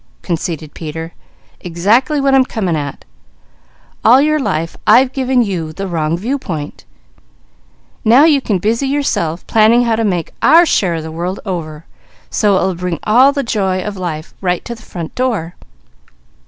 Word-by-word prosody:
conceded 165 -3 -4
Peter. 160 +1 -7 0.5
"Exactly 215 - +1
what 275 -1 +2
I'm 265 -1 +5
coming 195 -9 -2
at. 145 -2 -5 1.0
All 245 +4 +6
your 305 +2 +2
life 165 - -2
I've 250 +5 +5
given 260 -2 +1
you 170 -7 -4
the 195 +4 -5
wrong 165 -3 -1
viewpoint. 185 - -5 1.2
Now 240 +6 +6
you 295 -4 +4
can 210 -6 0
busy 225 +8 -1
yourselves 225 - -1
planning 225 +2 +4
how 230 -2 +1
to 225 - -1
make 180 -6 -2
our 340 +2 +6
share 185 - +1
of 160 - -4
the 160 - -7
world 175 +4 -4
over, 165 -5 -5 0.5
so 205 -3 +2
it - - +1
will 190 - 0
bring 180 -1 -3
all 250 +6 +5
the 280 -1 -2
joy 195 -5 -1
of 210 -1 -5
life 170 -4 -5
right 180 -2 -1
to 235 - -5
the 230 - -13
front 170 -6 -7
door. 225 -10 -2
195 Hz, 165 wpm, -15 LUFS, 165-250 Hz, 1.2 s, All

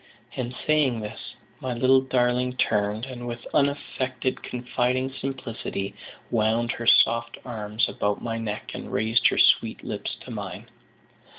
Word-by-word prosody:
And 125 -1 -3
saying 145 -7 +3
this, 105 0 -7 0.3
my 130 -2 -2
little 130 +2 +5
darling 125 -1 +1
turned, 105 +1 +1
and 125 -2 -7
with 120 0 -6
unaffected 135 -3 0
confiding 125 +1 -1
simplicity, 115 -7 -4 0.4
wound 115 +1 +2
her 115 - -5
soft 115 0 +5
arms 110 -2 -1
about 105 0 -1
my 115 -1 -3
neck, 105 -2 -4
and - - -7
raised 110 +2 +3
her - - +1
sweet - - +4
lips - - -4
to - - -9
mine. - - -6
120 Hz, 135 wpm, -26 LUFS, 110-130 Hz, 0.4 s, little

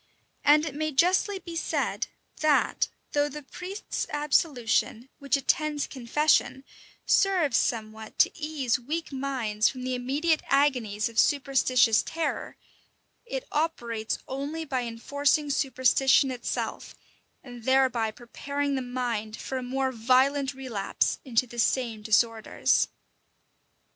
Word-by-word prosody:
And 300 +2 +5
it 310 - -4
may 310 +2 -2
justly 370 +7 +2
be 340 -2 -9
said, 330 - -1 0.3
that, 305 -2 +2 0.2
though 290 0 +1
the 295 +1 -8
priest's 370 +8 -5
absolution, 270 -5 0
which 280 -2 +1
attends 295 +2 0
confession, 270 +1 +1 0.4
serves 355 - +3
somewhat 220 -1 -3
to - - +5
ease 300 -6 -1
weak 310 +7 -4
minds 255 -6 0
from 255 -1 -7
the 255 0 -2
immediate 285 +6 0
agonies 250 -7 +2
of 230 -1 -2
superstitious 255 -5 +3
terror, 325 -1 -4 0.7
it - - -5
operates 235 -8 -2
only 285 +5 -4
by 260 -4 -2
enforcing 285 +5 0
superstition 265 0 +3
itself, 245 -2 -4 0.5
and 245 -3 -11
thereby 260 -4 +3
preparing 280 +5 -4
the 265 - -1
mind 240 -4 -3
for 265 - -4
a - - -5
more 265 +1 -1
violent 260 +4 +2
relapse 245 -7 -1
into 250 -1 +1
the 240 0 -9
same 230 -2 0
disorders. 220 +1 +2
265 Hz, 120 wpm, -27 LUFS, 240-295 Hz, 0.7 s, And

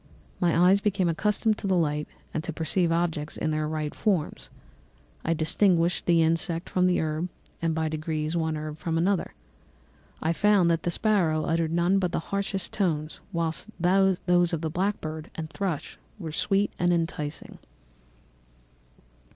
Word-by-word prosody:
My 175 -3 +2
eyes 185 +3 +5
became 195 -3 +1
accustomed 210 +5 +1
to - - -3
the 190 -1 +2
light 150 -2 0 0.3
and 155 - -2
to 170 - -3
perceive 165 +2 +1
objects 165 -3 -1
in 155 - -1
their 155 0 0
right 155 -1 -3
forms; 190 -8 -1 0.7
I 165 - +1
distinguished 170 +1 +2
the 170 -2 +5
insect 165 +2 0
from 180 0 +3
the 180 - +2
herb, 160 +3 -1 0.3
and 165 -1 0
by 160 0 0
degrees, 155 0 -2
one 160 -2 0
herb 155 0 -6
from 165 -1 -1
another. 185 +3 0 0.8
I 160 +1 0
found 195 -2 +4
that 165 -1 +1
the - - -1
sparrow 170 -5 +2
uttered 165 -1 0
none 175 +3 +3
but 180 -3 -1
harsh 200 +4 -2 0.2
notes, 155 -5 -1
whilst 165 +4 -2
those 190 +1 +3 0.4
of 160 - -1
the 160 -2 -2
blackbird 160 -4 -2
and 160 -1 -5
thrush 180 -6 -3 0.2
were 165 -6 -6
sweet 195 +5 +1
and 175 0 +3
enticing. 160 -3 -3
165 Hz, 155 wpm, -27 LUFS, 155-185 Hz, 0.8 s, eyes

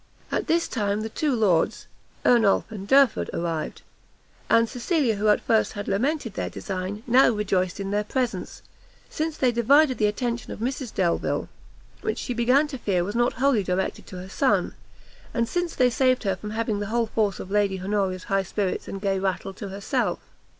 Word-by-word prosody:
At - - -1
this 335 +1 +2
time 205 -3 -1
the 220 - -4
two 285 +3 0
lords, 190 -8 +1 0.4
Ernolf 225 -3 +4
and 200 -2 -7
Derford, 270 -1 +4
arrived; 165 -2 -3 0.7
and 230 0 +5
Cecilia, 245 - 0
who 210 +2 0
at 210 - +5
first 220 -1 +2
had 205 -1 -6
lamented 235 +3 -1
their - - -3
design, 190 +3 -5
now 255 +3 +5
rejoiced 195 -5 0
in 195 0 -3
their 205 +1 +1
presence, 245 +2 -3 0.5
since 315 0 -2
they 255 -2 +3
divided 260 +4 +4
the 210 - +4
attention 235 +2 -3
of - - -6
Mrs 250 +1 -3
Delvile, 175 -3 0 0.5
which - - -2
she 250 - -3
began 250 +5 +3
to 270 -3 -6
fear 185 -6 0
was 200 +4 -4
not 240 +1 +2
wholly 265 -4 +2
directed 185 +1 -2
to - - -9
her 180 +1 -7
son, 260 +7 +1 0.6
and 235 -1 +1
since 350 +2 -2
they 250 -1 +3
saved 255 +1 +2
her 195 -2 0
from 210 +3 -7
having 220 -1 -1
the 205 - -3
whole 230 +2 +1
force 215 -2 -1
of 190 - -8
Lady 200 -2 +1
Honoria's 190 -1 -1
high 195 -1 +1
spirits 190 0 -2
and 195 - -5
gay 195 -1 0
rattle 195 0 -2
to 200 +1 -7
herself. 195 +1 -1
215 Hz, 185 wpm, -25 LUFS, 195-250 Hz, 0.7 s, and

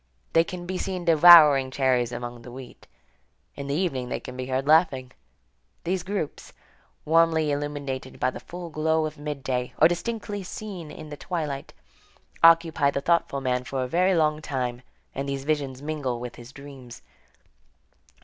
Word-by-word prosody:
They 165 - +5
can 175 +1 -7
be 185 +1 -4
seen 185 -2 -4
devouring 155 -5 +8
cherries 130 -3 +1
among 120 0 -6
the 120 - -11
wheat. 130 0 -12 0.7
In 140 0 -7
the 140 - -1
evening 135 -8 -1
they - - -3
can 125 - -9
be 130 0 -5
heard 130 +1 -2
laughing. 150 -5 +3 0.7
These 180 +2 -1
groups, 190 -4 -5 0.5
warmly 160 -1 +3
illuminated 145 -2 -4
by - - +1
the - - -8
full 175 -1 -9
glow 160 +1 +1
of 155 -1 -6
midday, 135 -4 -3
or - - +5
indistinctly 205 +4 -1
seen 185 -3 -7
in 155 0 -10
the 145 - -8
twilight, 150 -6 -4 0.7
occupy 165 -3 +5
the 140 0 -2
thoughtful 155 -3 +1
man 125 -1 -1
for 130 +1 -3
a - - -3
very 180 +6 +2
long 155 -1 +1
time, 125 -4 -3 0.3
and 140 +1 -4
these 135 -1 -3
visions 140 -3 -2
mingle 145 -6 -3
with 120 0 -7
his 120 +1 -12
dreams. 135 -4 -12
145 Hz, 160 wpm, -25 LUFS, 130-165 Hz, 0.7 s, devouring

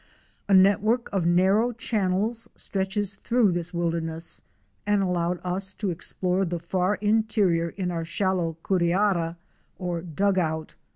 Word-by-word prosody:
A - - +4
network 210 +5 +4
of 180 -4 +1
narrow 190 +7 +3
channels 220 +1 -1
stretches 195 +1 -2
through 235 -5 +2
this 175 0 -2
wilderness 165 -1 -2 0.4
and 205 -1 +2
allowed 175 -1 0
us 190 +2 -2
to 200 -2 -2
explore 180 +2 -1
the 175 -1 -2
far 180 +4 0
interior 210 -6 +2
in 180 0 -3
our 165 -1 -2
shallow 170 -1 -1
curiara 175 -2 +1 0.4
or 175 -2 -3
dug 190 +4 +1
out. 160 -2 -2
185 Hz, 130 wpm, -26 LUFS, 170-205 Hz, 0.4 s, A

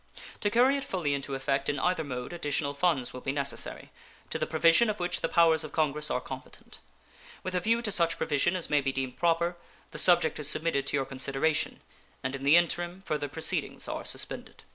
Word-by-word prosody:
To 205 - +1
carry 250 +6 +4
it 275 - -4
fully 170 - -1
into 140 0 -3
effect 135 0 -1
in 145 - -1
either 180 +3 +1
mode 125 0 -5
additional 145 -3 -1
funds 145 -5 0
will 125 - -7
be 135 - -2
necessary, 140 0 -4 0.4
to - - -2
the - - -1
provision 170 +8 +4
of 210 - -2
which 175 0 -1
the - - 0
powers 165 -2 +4
of 155 - -8
Congress 150 -1 +1
are - - 0
competent. 130 0 -10 0.6
With 185 - -4
a 180 - +2
view 230 +5 +1
to 215 - -1
such 170 -3 +2
provision 150 +4 +1
as 180 - -2
may 145 -1 +2
be 135 0 0
deemed 130 -1 -4
proper, 170 +1 +1 0.3
the - - -5
subject 170 -4 +4
is 150 -1 0
submitted 150 -4 0
to 145 - +1
your 135 - 0
consideration, 135 +4 -1 0.4
and 130 +1 -2
in 135 - -7
the 140 +3 +5
interim 175 +2 0
further 150 -4 -2
proceedings 160 +3 -2
are - - -4
suspended. - - -3
155 Hz, 205 wpm, -29 LUFS, 140-175 Hz, 0.6 s, the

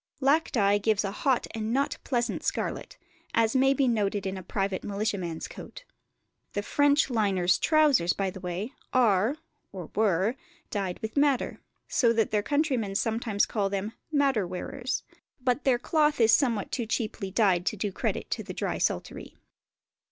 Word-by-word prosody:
Lac 290 +4 +2
dye 205 -3 +3
gives 215 0 +1
a 195 - -2
hot 255 +4 +1
and 220 0 -3
not 275 +3 0
pleasant 240 -2 -1
scarlet, - - -3 0.4
as 225 +2 +2
may 270 +1 +5
be 275 -1 +2
noted 205 -4 0
in 190 0 -2
a 190 - -6
private 195 +1 -2
militiaman's 200 -5 -3
coat. - - -10 0.7
The 205 - -2
French 285 +2 +3
liners' 195 -6 +2
trousers, 295 - +4
by 195 -1 -2
the 190 - -9
way, 185 +7 -4 0.2
are, 225 0 +3 0.4
or 180 -5 -8
were, 205 +2 +2 0.4
dyed 195 -4 -2
with 220 +5 -5
madder, 280 -2 +2 0.3
so 235 -2 +3
that 225 -1 +1
their 210 - +2
countrymen 260 -6 0
sometimes 220 -1 +1
call 200 -3 -1
them 200 +2 -3 0.2
the 300 - 0
"Madder 270 -9 +2
wearers"; 245 +9 -4 0.4
but 250 +2 0
their 260 -3 +4
cloth 300 +3 +1
is 225 -1 +5
somewhat 235 -8 +2
too 235 -4 -2
cheaply 215 -3 -2
dyed 190 -3 +2
to 215 - 0
do 205 +1 -2
credit - - -3
to - - -1
the - - -8
drysaltery. - - -2
220 Hz, 165 wpm, -28 LUFS, 195-260 Hz, 0.7 s, may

